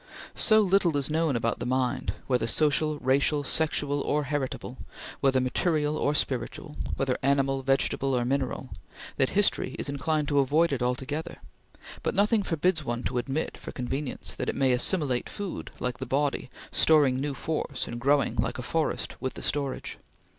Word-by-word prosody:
So 215 -1 +5
little 185 -5 +3
is 140 +1 -1
known 160 -3 +1
about 115 0 0
the - - -3
mind 125 -6 0
whether 125 -3 +1
social, 155 +3 +2
racial, 140 +2 +2
sexual 145 -1 0
or 150 +1 0
heritable; 135 -2 -3 0.4
whether 135 -1 +3
material 150 +3 +1
or 150 -1 +1
spiritual; 145 +3 -2 0.2
whether 135 -2 0
animal, 135 0 +2
vegetable 135 0 +1
or 120 -1 +1
mineral 130 0 -2 0.5
that 130 - +3
history 205 -9 +2
is - - -3
inclined 150 +2 0
to 145 -1 +3
avoid 145 +4 +3
it 130 - -2
altogether; 135 +7 -2 0.7
but - - -1
nothing 210 +2 +3
forbids 165 -2 0
one 120 -2 -3
to 125 - -1
admit, 135 +5 -3
for - - -8
convenience, 135 +2 -3
that - - -3
it - - -2
may 135 -2 +3
assimilate 125 0 +1
food 200 -3 -5
like 125 0 -3
the 130 - -4
body, 140 -1 0 0.2
storing 140 -5 +4
new 145 -1 -2
force 145 -1 -3
and 120 - -6
growing, 140 +2 +2
like - - 0
a - - -5
forest, - - -1
with 130 0 -3
the - - -6
storage. 140 -2 -2
140 Hz, 170 wpm, -27 LUFS, 130-155 Hz, 0.7 s, So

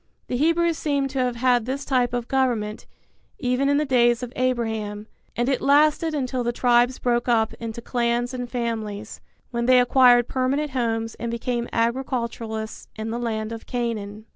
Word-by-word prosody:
The - - -1
Hebrews 335 +3 +2
seem 280 -2 0
to 270 0 -3
have 250 -1 0
had 245 -1 +2
this 275 +2 -3
type 250 -3 +1
of 245 -1 -3
government, 235 -5 -1 0.5
even 255 +1 0
in 285 - +3
the 300 - +1
days 240 -2 +3
of 245 0 -6
Abraham; 220 -5 -1 0.3
and 240 +1 0
it 265 -2 +1
lasted 305 +3 +3
until 255 -3 -1
the 240 - 0
tribes 245 +1 +3
broke 240 0 0
up 225 -2 +2
into 230 0 -6
clans 240 0 0
and 245 -1 -4
families, 220 -4 -4 0.3
when 235 0 -1
they 255 0 +7
acquired 245 -1 +5
permanent 270 +3 -1
homes 225 -3 -1
and 235 - -3
became 235 +1 -2
agriculturists 230 -2 -2
in 220 +1 -4
the 235 - -3
land 220 -2 -3
of 225 -1 -8
Canaan. 220 -4 -3
240 Hz, 170 wpm, -24 LUFS, 230-260 Hz, 0.5 s, they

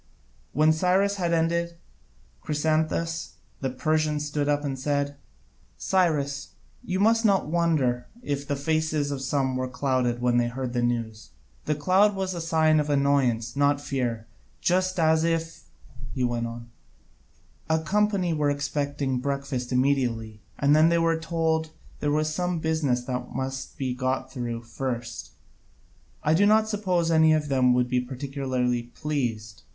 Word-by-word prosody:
When 155 +1 +4
Cyrus 190 +4 +2
had 175 -3 0
ended, 170 +1 +1 0.7
Chrysantas 160 +2 -1 0.3
the 135 - -1
Persian 155 +3 0
stood 150 -1 -2
up 145 0 +1
and 135 -2 -3
said: 145 +1 -1 0.6
"Cyrus, 150 -7 0 0.3
you 185 +1 -2
must 225 +3 +4
not 195 -8 +2
wonder 150 -8 +1 0.2
if 140 - -3
the 145 - 0
faces 155 0 0
of 140 -2 -3
some 135 -1 0
were 130 0 -1
clouded 125 -2 0
when 125 0 +2
they 120 0 +2
heard 125 0 -4
the 120 - 0
news. 115 -2 -2 0.4
The 150 - 0
cloud 190 +7 +3
was 190 -1 -2
a 170 - -4
sign 160 -1 +3
of 150 0 -1
annoyance, 135 -5 +1
not 145 +1 +3
of 145 - -12
fear. 120 -5 -2 0.3
Just 185 +1 +1
as 160 0 +3
if," 165 0 -2 0.5
he 130 - -1
went 120 -1 0
on, 115 0 -9 1.0
"a 160 - +3
company 195 0 +1
were 150 -2 +1
expecting 145 -2 -1
breakfast 140 -2 -3
immediately, 125 -5 0 0.2
and 145 +1 +4
then 155 +2 +6
were 165 -1 +2
told 160 -1 0 0.3
there 145 - 0
was 155 +1 +1
some 180 +1 -1
business 160 -6 0
that 125 -1 -5
must 135 0 -4
be 130 -2 -2
got 130 +1 -2
through 120 -2 -4
first, 120 -3 -5 0.9
I 155 - +3
do 200 +5 +4
not 215 +1 +4
suppose 185 -6 0
any 160 -1 +5
of 150 -2 0
them 130 -2 +3
would 125 0 +2
be 125 0 +1
particularly 130 -1 -2
pleased. 120 -4 -4
145 Hz, 150 wpm, -26 LUFS, 125-160 Hz, 1.0 s, then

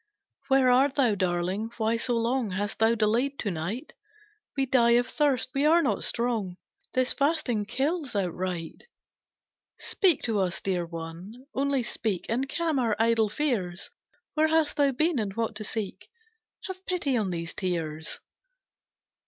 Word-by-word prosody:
"Where 265 -2 +5
art 265 +2 +4
thou, 250 -6 +3
darling 185 +3 -1
why 225 0 +1
so 240 0 0
long 235 0 0
Hast 200 +2 -3
thou 225 +1 +4
delayed 235 +6 +1
to 205 - -2
night? 180 - -4 0.6
We 270 - +2
die 235 -2 +4
of 245 - +2
thirst, 280 -5 +1
we 275 - +1
are 330 +3 +5
not 275 - 0
strong, 225 -7 -1 0.4
This 255 0 +2
fasting 280 -8 +1
kills 280 - -1
outright. 180 - -3 0.9
"Speak 365 -8 +2
to 225 -3 0
us, 185 -2 0
dear 180 -3 -1
one, 170 +9 -8
only 275 -1 +1
speak, 215 -5 -2
And 260 +4 0
calm 320 -1 0
our 230 -4 +1
idle 225 -1 +3
fears, 200 -10 -2 0.4
Where 315 0 +3
hast 315 -1 +2
thou 285 -2 +3
been, 310 +2 +1
and 200 -3 -3
what 230 0 -1
to 215 - -5
seek? 210 -1 -4 0.5
Have 375 0 -7
pity 345 -8 0
on 215 -5 0
these 170 -1 -4
tears." 160 -4 -3
230 Hz, 155 wpm, -27 LUFS, 195-275 Hz, 0.9 s, Where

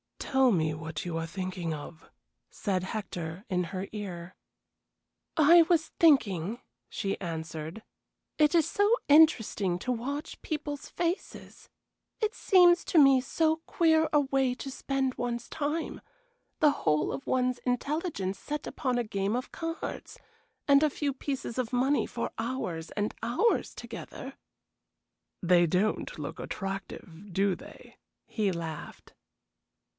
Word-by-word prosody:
"Tell 265 -1 +3
me 160 -5 +1
what 160 0 -5
you 170 -2 -3
are 165 0 -3
thinking 180 -1 -4
of?" 155 +2 -9 0.4
said 185 -3 -2
Hector, 185 -4 -5
in 180 -1 0
her 190 +2 -5
ear. 185 -4 -6 1.0
"I 330 +2 +7
was 325 -1 +1
thinking," 225 - +3 0.3
she 195 -3 -3
answered, 160 +2 -5 0.6
"it 300 +2 +4
is 330 -3 +4
so 410 0 +2 0.2
interesting 225 - +5
to 250 - -2
watch 275 +5 -4
people's 295 -2 -4
faces. 345 +2 -4 0.5
It 435 0 0
seems 355 -5 +5
to - - 0
me 275 -3 +7
so 315 +4 +1
queer 320 -1 +3
a 295 - +6
way 270 -2 +1
to 270 +1 -6
spend 265 -1 -1
one's 240 -1 -3
time, 310 +2 -3 0.6
the 300 -1 +6
whole 150 - +1
of 135 - -6
one's 255 -1 +1
intelligence 250 - -2
set 300 0 -4
upon 255 -2 -1
a 240 - +1
game 200 0 -1
of 250 - -4
cards 330 0 -5 0.5
and 280 0 +6
a 310 - +4
few 285 -1 -2
pieces 260 -2 -4
of 250 -1 -2
money 265 +4 +2
for 235 - -4
hours 205 -9 -3
and 205 0 -2
hours 325 - +1
together." - - -8 1.1
"They 175 -1 +5
don't 190 +6 0
look - - -6
attractive, 195 -1 -6
do 195 +1 +2
they?" - - -12 0.3
he 210 -4 0
laughed. 165 -3 -7
240 Hz, 135 wpm, -29 LUFS, 185-290 Hz, 1.1 s, I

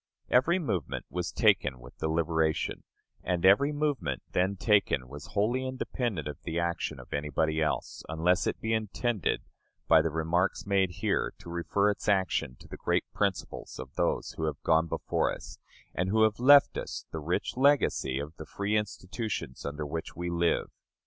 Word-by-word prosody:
Every 165 +8 +4
movement 100 - -2
was 90 0 -2
taken 65 -2 +2
with - - -14
deliberation, 80 0 0 0.4
and 90 -1 0
every 105 +10 +6
movement 145 -3 -1
then 95 +2 +1
taken 95 - +2
was 70 +3 -10
wholly 115 +6 +1
independent 120 - -3
of 75 - -7
the 80 -1 -4
action 85 -5 -2
of 65 - -10
anybody 75 +2 0
else; 75 - -1
unless 85 +3 +2
it - - -2
be 110 0 -1
intended, 110 - -1 0.4
by 80 -1 +7
the 80 - 0
remarks 80 +4 0
made 100 -2 +2
here, 85 - -1
to 85 - -10
refer 100 +4 +1
its 105 - -3
action 95 -10 +1
to - - -13
the - - -8
great - - +1
principles 100 -3 -2
of 65 0 -8
those - - 0
who 80 - -3
have 75 -2 -2
gone 80 0 +3
before - - 0
us, - - -8 0.3
and 90 +1 -1
who 110 +2 +4
have 110 0 +2
left 140 +3 +7
us - - -6
the 80 - -4
rich 80 +4 -2
legacy 130 - +3
of 75 +3 -5
the 80 - -7
free 100 +1 -1
institutions 105 - -3
under 75 +1 -4
which 80 +3 -5
we 85 +1 -3
live. 85 0 +1
90 Hz, 170 wpm, -29 LUFS, 80-105 Hz, 0.4 s, by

